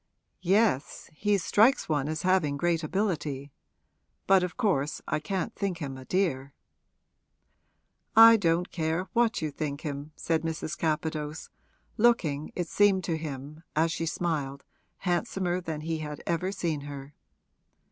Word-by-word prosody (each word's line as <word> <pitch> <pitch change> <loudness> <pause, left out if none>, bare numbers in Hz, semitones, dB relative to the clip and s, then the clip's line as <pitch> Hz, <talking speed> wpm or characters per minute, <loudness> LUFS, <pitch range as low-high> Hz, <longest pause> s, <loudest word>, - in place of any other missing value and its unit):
'Yes; 190 - +1
he 205 +5 +1
strikes 215 +8 +3
one 150 -2 0
as 155 +1 -3
having 180 -6 +2
great 170 +1 +1
ability. 150 -6 -2 0.7
But 195 -1 +5
of 180 -1 -3
course 160 - 0
I 155 - 0
can't 195 +7 -3
think 195 -4 -2
him 140 -5 -5
a 130 0 -10
dear.' 140 -8 0 1.6
'I 225 +1 +10
don't 175 -2 +1
care 165 +2 -1
what 230 -6 +2
you 155 - -1
think 145 0 -4
him!' 145 -1 -5
said 160 -1 0
Mrs. 160 -1 -3
Capadose, 155 -1 -2 0.5
looking, 175 -11 +2
it 175 -2 -2
seemed 200 -1 +3
to 165 -1 -1
him, 150 -1 -6
as 160 +2 +2
she 165 0 -2
smiled, 150 -5 -2 0.3
handsomer 180 0 -1
than 160 -3 -4
he 160 0 -2
had 150 -1 -6
ever 170 +3 -1
seen 165 -6 -2
her. 140 0 -8
165 Hz, 140 wpm, -28 LUFS, 150-185 Hz, 1.6 s, I